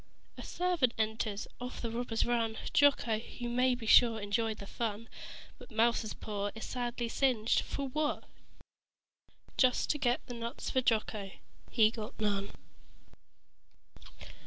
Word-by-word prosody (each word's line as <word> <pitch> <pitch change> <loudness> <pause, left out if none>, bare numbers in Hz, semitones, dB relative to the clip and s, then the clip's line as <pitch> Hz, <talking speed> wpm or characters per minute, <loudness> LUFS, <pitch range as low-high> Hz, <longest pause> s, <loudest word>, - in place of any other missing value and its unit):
A - - -8
servant 350 -9 0
enters. 220 -1 -1
Off 250 +1 -6
the 230 - -3
robbers 230 -1 -1
run. 230 -2 0 0.2
Jocko, 245 -6 +4 0.2
you 240 - -4
may 250 +1 +3
be 240 -2 -8
sure, 225 0 +6
enjoyed 215 +2 -1
the 200 - -8
fun. 225 +1 -3 0.5
But - - -12
Mouser's 230 -1 +1
paw 205 -1 -3
is 220 - -6
sadly 240 -1 -3
singed 235 -3 +2
for 280 -1 -4
what? 295 +3 -1 1.3
Just 255 -2 +3
to 295 - -2
get 245 -2 0
nuts 235 -1 -5
for 260 - +2
Jocko. 215 -4 0 0.4
He 220 -2 +4
got 220 -2 -7
none. 200 -2 0
230 Hz, 135 wpm, -32 LUFS, 220-250 Hz, 1.3 s, sure